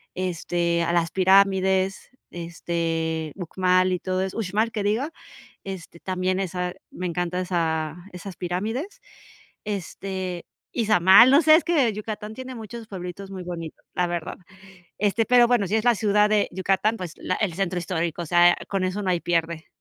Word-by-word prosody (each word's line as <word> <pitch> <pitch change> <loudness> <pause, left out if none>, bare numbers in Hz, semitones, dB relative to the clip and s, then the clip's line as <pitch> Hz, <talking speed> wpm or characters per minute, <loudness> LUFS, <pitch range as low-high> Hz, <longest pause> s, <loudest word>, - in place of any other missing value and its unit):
este, 170 -1 -1
a 170 - 0
las 170 -1 +1
pirámides, 190 0 +3 0.2
este, 165 -2 -3
Uxmal 185 0 +1
y 180 - -1
todo 185 +1 -2
eso, 190 +2 -5
Uxmal 215 +2 0
que 210 -3 -3
diga, 225 +10 0 0.5
este, 190 -3 -8
también 185 0 -1
esa, 180 -1 -3 0.2
me 180 - -5
encanta 180 +1 -2
esa 160 -3 -1 0.2
esas 180 0 -8
pirámides. 225 - -3 0.6
Este, 190 -2 -5 0.3
Izamal, 215 0 +6
no 285 +4 +6
sé, 310 0 +7
es 330 - 0
que 300 -9 +2
Yucatán 210 0 -6
tiene 260 +2 -7
muchos 230 0 -8
pueblitos 190 0 -7
muy 190 -2 -6
bonitos, 165 -3 -7
la 180 - +1
verdad. 175 -2 -4 0.6
Este, 210 +2 +1
pero 245 0 +6
bueno, 235 -5 +2
si 205 - -1
es 220 - 0
la 240 -1 +5
ciudad 210 0 +3
de 210 -1 +2
Yucatán, 195 +4 +1
pues, 175 -3 -6
la 185 - -2
el 200 -6 -1
centro 185 -1 -1
histórico, 170 -1 -2
o - - -6
sea, 175 +2 +5
con 195 -2 -1
eso 185 +3 -2
no 190 - 0
hay 175 -1 +1
pierde. 170 -1 -1
185 Hz, 165 wpm, -24 LUFS, 175-210 Hz, 0.6 s, sé